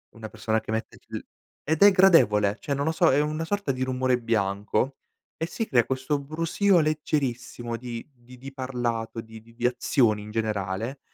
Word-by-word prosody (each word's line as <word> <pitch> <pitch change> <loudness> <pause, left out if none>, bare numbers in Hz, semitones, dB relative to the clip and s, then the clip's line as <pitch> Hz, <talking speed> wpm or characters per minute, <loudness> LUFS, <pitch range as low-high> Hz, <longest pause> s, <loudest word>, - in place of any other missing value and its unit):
una 110 -1 -8
persona 110 0 -1
che 110 - -7
mette 110 0 -3
l - - -5 0.5
ed 160 +3 0
è 205 - +9
gradevole, 105 - +5
cioè, 145 - -3
non 140 +1 -1
lo 160 - +1
so, 165 +1 +3
è 140 +3 +4
una 155 +2 -2
sorta 200 -6 -1
di 130 0 -2
rumore 130 -1 +1
bianco 110 +3 0 0.4
e 160 - -1
si 225 +6 -3
crea 120 - +3
questo 130 +2 -1
brusio 165 +5 +2
leggerissimo 130 -6 -2
di 120 -1 -6
di 125 0 -16
di 135 +2 -9
parlato, 120 -4 -3
di 110 0 -12
di 115 +1 -20
di 120 - -3
azioni 120 -3 +2
in 105 - -9
generale 110 +3 -2
125 Hz, 185 wpm, -26 LUFS, 115-150 Hz, 0.5 s, è